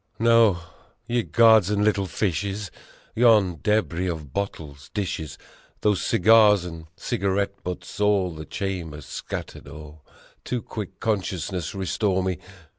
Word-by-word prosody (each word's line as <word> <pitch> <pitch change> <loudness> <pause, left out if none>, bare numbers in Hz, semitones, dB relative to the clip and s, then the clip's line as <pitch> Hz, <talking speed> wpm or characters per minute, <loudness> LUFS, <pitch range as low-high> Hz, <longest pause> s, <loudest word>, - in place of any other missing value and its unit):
No! 115 -5 +4 0.5
Ye 120 0 0
gods 110 -4 +5
and 105 0 +1
little 100 -3 +1
fishes! 100 +3 -2 0.4
Yon 105 -8 +4
debris 95 -4 0
of 75 -5 -6
bottles 75 -8 -5
dishes 85 -7 -3 0.4
Those 105 -3 +2
cigar 105 +1 +5
and 85 -2 -8
cigarette 100 +1 -1
butts 90 +2 -6
all 100 -4 +2
the 80 0 -8
chamber 85 -5 -4
scattered - - -7
o'er, 75 0 -11 0.5
To 125 -2 -2
quick 105 -3 -7
consciousness 95 -4 -2
restore 95 0 0
me. 95 -1 -2
95 Hz, 120 wpm, -24 LUFS, 85-105 Hz, 0.5 s, gods